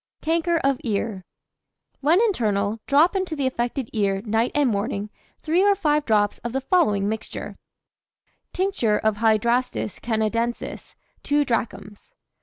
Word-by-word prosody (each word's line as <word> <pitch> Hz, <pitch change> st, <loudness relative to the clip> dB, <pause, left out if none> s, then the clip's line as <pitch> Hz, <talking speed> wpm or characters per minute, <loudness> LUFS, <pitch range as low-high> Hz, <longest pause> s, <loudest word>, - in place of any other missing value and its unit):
CANKER 335 Hz, +2 st, +1 dB
OF 275 Hz, -1 st, +1 dB
EAR. 205 Hz, -4 st, -2 dB, 0.7 s
When 315 Hz, +6 st, +3 dB
internal, 215 Hz, -, 0 dB
drop 310 Hz, +7 st, +4 dB
into 375 Hz, -4 st, -1 dB
the 280 Hz, -3 st, -1 dB
affected 245 Hz, 0 st, -2 dB
ear, 195 Hz, -2 st, 0 dB
night 225 Hz, +2 st, +1 dB
and 290 Hz, -2 st, +3 dB
morning, 205 Hz, -1 st, -2 dB, 0.3 s
3 330 Hz, +4 st, +2 dB
or 405 Hz, 0 st, +4 dB
5 300 Hz, -5 st, +1 dB
drops 210 Hz, -2 st, +1 dB
of 240 Hz, 0 st, -5 dB
the 270 Hz, -, -1 dB
following 210 Hz, -, +2 dB
mixture: 220 Hz, +1 st, -5 dB, 1.0 s
Tincture 360 Hz, -, 0 dB
of 220 Hz, -1 st, 0 dB
Hydrastis 230 Hz, +1 st, +1 dB
Canadensis 230 Hz, +1 st, -2 dB, 0.3 s
2 290 Hz, 0 st, +1 dB
drachms. 230 Hz, -, -4 dB
235 Hz, 130 wpm, -23 LUFS, 215-295 Hz, 1.0 s, drop